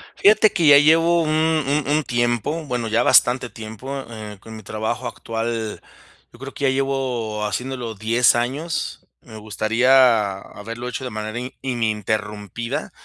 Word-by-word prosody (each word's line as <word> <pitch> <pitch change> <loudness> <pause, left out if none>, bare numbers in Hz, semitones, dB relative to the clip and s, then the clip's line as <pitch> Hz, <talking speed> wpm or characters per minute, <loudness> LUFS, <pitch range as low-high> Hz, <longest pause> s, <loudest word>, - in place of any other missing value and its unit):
Fíjate 215 +1 +5
que 170 -5 +2
ya 145 -1 +9
llevo 165 +3 +4
un 155 - -2 0.4
un 145 +1 0
un 150 +1 +2
tiempo, 120 +6 -1
bueno, 125 -3 -3
ya 115 +2 +2
bastante 125 0 +4
tiempo, 115 +5 -7
eh, 105 -2 -8
con 110 +2 -11
mi 110 - -9
trabajo 110 +4 -3
actual. 115 -2 -4 0.5
Yo 120 - -17
creo 135 +1 -8
que 140 - -3
ya - - +4
llevo 130 -5 -2
haciéndolo 120 +2 -4
10 115 +4 +3
años. 150 +6 -3 0.2
Me 110 -3 -12
gustaría 110 0 +3
haberlo 115 +5 -8
hecho 125 +1 -5
de 125 - -4
manera 110 +1 -5
i 125 +1 -7
ininterrumpida, 110 -2 -3
120 Hz, 150 wpm, -21 LUFS, 110-135 Hz, 0.5 s, ya